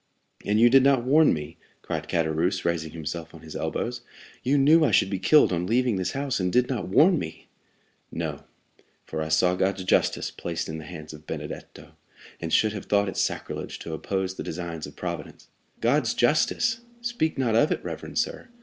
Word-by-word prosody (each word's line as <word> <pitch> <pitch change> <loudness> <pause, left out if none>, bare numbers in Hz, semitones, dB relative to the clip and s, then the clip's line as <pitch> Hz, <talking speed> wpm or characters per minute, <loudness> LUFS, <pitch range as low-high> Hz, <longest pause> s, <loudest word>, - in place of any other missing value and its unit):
'" - - -26
"And 105 +1 +2
you 120 - +7
did 135 +2 +6
not 135 -2 +4
warn 150 +5 +5
me!" 75 +1 -4 0.3
cried - - -4
Caderousse, 85 +3 0
raising 85 -2 0
himself 80 +1 -6
on 80 - -12
his 80 -1 -10
elbows. - - -3 0.4
"You 140 +3 +2
knew 155 +4 +6
I 150 - +4
should 95 -2 +3
be 95 - -1
killed 145 +2 +5
on 90 +1 -1
leaving 120 -1 +2
this 95 - -2
house, 135 -3 -1
and 90 -1 0
did 125 +3 +3
not 125 -8 -3
warn 160 - +5
me!" 80 - -7 0.7
40168m - - -9
"No; - - -3 0.6
for 80 - -4
I 80 - -2
saw 90 +3 +3
God's 95 +1 0
justice 90 - +1
placed 85 -1 -4
in 80 0 -5
the 80 - -9
hands 80 -1 -9
of 75 0 -13
Benedetto, - - -8 0.4
and 80 -1 -4
should 110 +4 +3
have 100 - -6
thought 100 -1 +2
it - - -7
sacrilege - - -3
to 80 - -7
oppose 95 +3 -2
the - - -6
designs 85 -2 -5
of - - -13
Providence." - - -6 0.3
"God's - - +2
justice! 225 0 +2 0.2
Speak 235 -12 -1
not 125 -4 +1
of 115 +7 +4
it, - - -1
reverend - - -6
sir. - - -2
95 Hz, 200 wpm, -26 LUFS, 80-130 Hz, 0.7 s, you